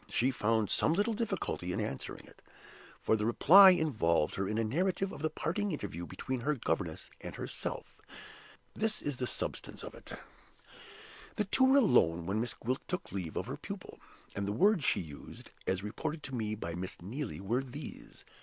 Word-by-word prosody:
She 130 Hz, +3 st, +2 dB
found 110 Hz, -3 st, +1 dB
some 155 Hz, -, +3 dB
little 205 Hz, +6 st, +1 dB
difficulty 205 Hz, -, -2 dB
in -, -, -1 dB
answering 70 Hz, -, -4 dB
it, -, -, -18 dB, 0.6 s
for -, -, +4 dB
the 105 Hz, -, -1 dB
reply 180 Hz, -, +9 dB
involved 110 Hz, -, +2 dB
her 95 Hz, 0 st, -1 dB
in 105 Hz, -, -1 dB
a 115 Hz, -, +2 dB
narrative 185 Hz, -, 0 dB
of 140 Hz, -, -8 dB
the 155 Hz, -, +1 dB
parting 195 Hz, +6 st, -1 dB
interview 85 Hz, -, -4 dB
between 130 Hz, +7 st, -4 dB
her 150 Hz, +5 st, 0 dB
governess 125 Hz, -, -2 dB
and -, -, -7 dB
herself. -, -, -5 dB, 0.8 s
This 220 Hz, 0 st, -1 dB
is 145 Hz, -3 st, -2 dB
the 125 Hz, -, -2 dB
substance -, -, -5 dB
of -, -, -7 dB
it. -, -, -10 dB, 1.2 s
The 210 Hz, -, 0 dB
two 260 Hz, +7 st, +3 dB
were 265 Hz, +2 st, +6 dB
alone 85 Hz, -, +4 dB
when 100 Hz, +5 st, 0 dB
Miss 120 Hz, 0 st, -3 dB
Gwilt 130 Hz, +3 st, -2 dB
took 180 Hz, -, -4 dB
leave 90 Hz, -5 st, -4 dB
of -, -, -1 dB
her -, -, -5 dB
pupil; -, -, -8 dB, 0.4 s
and 100 Hz, 0 st, -2 dB
the 100 Hz, -, 0 dB
words 195 Hz, -, +4 dB
she -, -, +2 dB
used 75 Hz, -4 st, -10 dB, 0.2 s
(as 95 Hz, +1 st, 0 dB
reported 150 Hz, +9 st, -4 dB
to 135 Hz, -, -5 dB
me 110 Hz, -2 st, -1 dB
by 85 Hz, -5 st, -5 dB
Miss 90 Hz, +2 st, -4 dB
Neelie) 110 Hz, -, -4 dB
were 110 Hz, +7 st, 0 dB
these. 135 Hz, +2 st, -9 dB
125 Hz, 185 wpm, -32 LUFS, 100-165 Hz, 1.2 s, reply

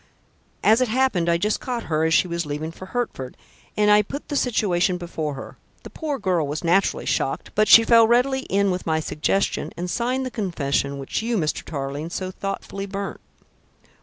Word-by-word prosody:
"As 220 Hz, +4 st, +5 dB
it 255 Hz, -, +3 dB
happened, 220 Hz, -8 st, +1 dB
I 170 Hz, -, +3 dB
just 210 Hz, +5 st, 0 dB
caught 245 Hz, -2 st, -4 dB
her 155 Hz, -1 st, 0 dB
as 160 Hz, -, +1 dB
she -, -, +3 dB
was 170 Hz, 0 st, -2 dB
leaving 150 Hz, +1 st, -4 dB
for 185 Hz, +3 st, -11 dB
Hertford, 190 Hz, -, -4 dB, 0.4 s
and 210 Hz, 0 st, +4 dB
I 210 Hz, 0 st, +7 dB
put 275 Hz, +8 st, -7 dB
the 290 Hz, -, -2 dB
situation 190 Hz, -8 st, +1 dB
before 160 Hz, -4 st, -4 dB
her. 135 Hz, -, -9 dB, 0.3 s
The -, -, -10 dB
poor 300 Hz, -3 st, -3 dB
girl 180 Hz, -, 0 dB
was 150 Hz, +4 st, -4 dB
naturally 180 Hz, +4 st, +2 dB
shocked, -, -, -1 dB
but 215 Hz, 0 st, +3 dB
she 230 Hz, -, +9 dB
readily 240 Hz, +4 st, +4 dB
fell 195 Hz, -, +1 dB
in 200 Hz, -1 st, +2 dB
with 180 Hz, -1 st, -4 dB
my 160 Hz, -1 st, +2 dB
suggestion 160 Hz, +5 st, -1 dB
and 175 Hz, +1 st, -3 dB
signed 255 Hz, +2 st, -1 dB
the 255 Hz, -, -4 dB
confession 140 Hz, -9 st, -1 dB
which 135 Hz, +8 st, -3 dB
you, 230 Hz, 0 st, -1 dB
Mr. 155 Hz, -5 st, -1 dB
Tarling, 140 Hz, +1 st, -5 dB
so 185 Hz, +1 st, -4 dB
thoughtfully 195 Hz, +1 st, -5 dB
burnt." 200 Hz, 0 st, -5 dB
190 Hz, 190 wpm, -23 LUFS, 160-225 Hz, 0.4 s, she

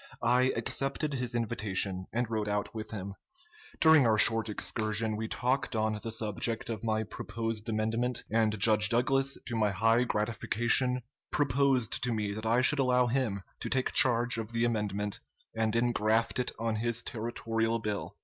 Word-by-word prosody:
I 125 Hz, +2 st, +3 dB
accepted 140 Hz, +2 st, -1 dB
his 125 Hz, -2 st, -3 dB
invitation, 100 Hz, -5 st, -1 dB
and 120 Hz, +1 st, -1 dB
rode 110 Hz, -2 st, -2 dB
out 105 Hz, +2 st, -2 dB
with 110 Hz, -1 st, -6 dB
him. 100 Hz, -2 st, -6 dB, 0.7 s
During 160 Hz, -5 st, +6 dB
our 110 Hz, -1 st, +3 dB
short 115 Hz, +1 st, +5 dB
excursion 110 Hz, +1 st, -1 dB
we 110 Hz, +1 st, -3 dB
talked 130 Hz, +2 st, -1 dB
on 110 Hz, -1 st, 0 dB
the 115 Hz, -, -5 dB
subject 115 Hz, +1 st, -1 dB
of 110 Hz, 0 st, -6 dB
my 110 Hz, -1 st, 0 dB
proposed 115 Hz, +1 st, -4 dB
amendment, 115 Hz, +3 st, -1 dB
and 110 Hz, -1 st, +2 dB
Judge 105 Hz, -1 st, +5 dB
Douglas, 135 Hz, +3 st, +1 dB
to 120 Hz, -, -4 dB
my 110 Hz, -2 st, +2 dB
high 115 Hz, +5 st, +2 dB
gratification, 120 Hz, +3 st, 0 dB, 0.3 s
proposed 135 Hz, -4 st, +1 dB
to 125 Hz, -, 0 dB
me 105 Hz, -3 st, -2 dB
that 110 Hz, +1 st, -5 dB
I 120 Hz, +3 st, +3 dB
should 145 Hz, +2 st, +4 dB
allow 125 Hz, -1 st, +3 dB
him 120 Hz, -6 st, -1 dB, 0.2 s
to -, -, -5 dB
take 130 Hz, -1 st, 0 dB
charge 120 Hz, -2 st, +3 dB
of 110 Hz, +1 st, -6 dB
the 115 Hz, 0 st, +1 dB
amendment 105 Hz, -3 st, -2 dB, 0.4 s
and 110 Hz, 0 st, 0 dB
ingraft 115 Hz, -1 st, +1 dB
it 125 Hz, -, 0 dB
on 115 Hz, -1 st, -2 dB
his 120 Hz, +1 st, -1 dB
territorial 115 Hz, 0 st, -2 dB
bill. 105 Hz, -2 st, -5 dB
115 Hz, 165 wpm, -30 LUFS, 110-125 Hz, 0.7 s, During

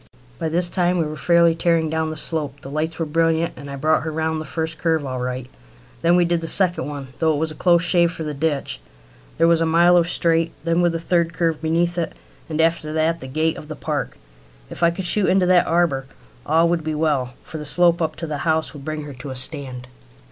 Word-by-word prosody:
By 160 Hz, -, -1 dB
this 175 Hz, +2 st, +2 dB
time 180 Hz, 0 st, +1 dB
we 165 Hz, -, +1 dB
were 155 Hz, 0 st, -5 dB
fairly 170 Hz, +2 st, +4 dB
tearing 165 Hz, -1 st, +1 dB
down 160 Hz, 0 st, -1 dB
the 155 Hz, -, -5 dB
slope. 150 Hz, -3 st, -1 dB
The 135 Hz, -, -9 dB
lights 155 Hz, +2 st, -2 dB
were 165 Hz, -, -1 dB
brilliant, 165 Hz, +1 st, +1 dB
and 140 Hz, 0 st, -10 dB
I 140 Hz, -, -5 dB
brought 155 Hz, +3 st, +2 dB
her 160 Hz, -, -4 dB
round 160 Hz, 0 st, -2 dB
the -, -, -7 dB
first 160 Hz, +2 st, -4 dB
curve 160 Hz, -3 st, 0 dB
all 130 Hz, -1 st, -4 dB
right. 125 Hz, 0 st, -4 dB, 0.5 s
Then 170 Hz, +1 st, +4 dB
we 175 Hz, -1 st, +4 dB
did 170 Hz, -1 st, 0 dB
the 165 Hz, -, -4 dB
second 175 Hz, -2 st, +1 dB
one, 140 Hz, -3 st, -7 dB
though 160 Hz, -1 st, +3 dB
it -, -, -1 dB
was 160 Hz, +1 st, -1 dB
a -, -, -8 dB
close 170 Hz, +1 st, +3 dB
shave 175 Hz, -1 st, +3 dB
for 165 Hz, -, -6 dB
the 150 Hz, -1 st, -4 dB
ditch. 145 Hz, 0 st, -2 dB, 0.6 s
There 165 Hz, -, +4 dB
was 170 Hz, -1 st, +3 dB
a -, -, +3 dB
mile 170 Hz, +2 st, +5 dB
of 175 Hz, 0 st, +3 dB
straight 165 Hz, -1 st, +1 dB
then 165 Hz, +1 st, +1 dB
with 175 Hz, -1 st, +2 dB
the 165 Hz, -, -2 dB
third 170 Hz, 0 st, 0 dB
curve 165 Hz, -2 st, -1 dB
beneath 170 Hz, +2 st, 0 dB
it, 165 Hz, -, -2 dB, 0.4 s
and 155 Hz, 0 st, -3 dB
after 160 Hz, -1 st, +1 dB
that 160 Hz, +1 st, 0 dB
the 130 Hz, -, -7 dB
gate 155 Hz, +4 st, 0 dB
of 150 Hz, -, -11 dB
the 155 Hz, -, -6 dB
park. -, -, -4 dB, 0.5 s
If -, -, -8 dB
I 170 Hz, -, +5 dB
could 180 Hz, +2 st, -5 dB
shoot 195 Hz, +2 st, +3 dB
into 190 Hz, 0 st, +3 dB
that 180 Hz, -1 st, +4 dB
harbour 165 Hz, -6 st, +1 dB, 0.4 s
all 165 Hz, +2 st, +4 dB
would 170 Hz, -2 st, 0 dB
be 155 Hz, 0 st, -2 dB
well, 140 Hz, -5 st, 0 dB
for 160 Hz, -, -8 dB
the -, -, -6 dB
slope 170 Hz, +2 st, +3 dB
up 160 Hz, -1 st, -1 dB
to 165 Hz, -, -5 dB
the 150 Hz, -2 st, -4 dB
house 160 Hz, 0 st, 0 dB
would 145 Hz, -2 st, -10 dB
bring 155 Hz, +1 st, -4 dB
her 145 Hz, -1 st, -8 dB
to 130 Hz, +2 st, -9 dB
a 130 Hz, -, -6 dB
stand. 130 Hz, -2 st, -2 dB
160 Hz, 250 wpm, -21 LUFS, 150-170 Hz, 0.6 s, mile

